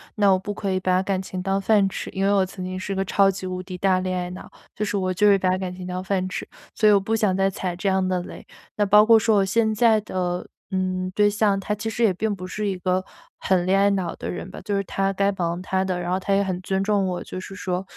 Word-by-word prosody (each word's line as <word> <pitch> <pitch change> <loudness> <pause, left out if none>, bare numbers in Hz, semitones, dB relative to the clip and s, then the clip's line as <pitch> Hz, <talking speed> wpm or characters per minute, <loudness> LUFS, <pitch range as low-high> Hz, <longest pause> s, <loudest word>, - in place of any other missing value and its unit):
那 200 -2 +4
我 190 - +4
不 205 +2 -5
可 200 -2 -3
以 185 - 0
把 185 0 +2
感 190 0 -1
情 185 -1 -6
当 195 +1 0
饭 200 -1 +3
吃， - - -6
因 195 - -2
为 200 - +3
我 195 -2 +3
曾 185 0 -8
经 185 0 -4
是 195 +1 -4
个 195 0 0
超 195 +1 +3
级 190 0 -6
无 185 0 -4
敌 185 -1 -7
大 185 0 +2
恋 185 0 -2
爱 180 0 -3
脑。 180 - -10 0.2
就 210 - -2
是 205 - -2
我 185 -1 0
就 210 +3 +3
是 205 - +7
会 195 - +4
把 185 0 +1
感 185 -1 -4
情 180 0 -8
当 180 +1 -4
饭 190 -1 -1
吃， - - -5 0.3
所 215 - +3
以 - - +7
我 200 - +5
不 220 +3 -1
想 210 -4 +1
再 195 0 +2
踩 185 -2 -4
这 190 +3 -1
样 190 -1 +1
的 185 -1 0
雷。 - - -10 0.3
那 205 - +2
包 210 +2 +6
括 225 0 +7
说 220 -1 +3
我 195 - +3
现 220 +3 +1
在 220 0 +4
的， 180 -3 -3 0.2
嗯， 185 -1 -2
对 210 0 +4
象， 205 -1 +1
他 210 - -2
其 215 +2 -3
实 230 +1 -1
也 210 -4 +4
并 210 +3 -1
不 185 -1 -8
是 210 +3 -3
一 195 -2 -2
个 185 +1 0 0.4
很 180 -2 +1
恋 195 +1 +3
爱 200 +1 +4
脑 185 -4 -2
的 - - -6
人 180 - -5
吧。 - - -9
就 205 -1 -1
是 200 - 0
他 195 +1 -1
该 200 +1 +1
忙 175 -2 -2
他 190 0 0
的， 185 -2 -2
然 175 0 -3
后 185 - +1
他 195 +1 0
也 200 - +3
很 185 -2 -3
尊 190 +1 -1
重 200 -1 +1
我。 180 -1 -3
就 - - -7
是 195 +1 -9
说， 185 -1 -3
190 Hz, 315 characters per minute, -23 LUFS, 185-200 Hz, 0.4 s, 是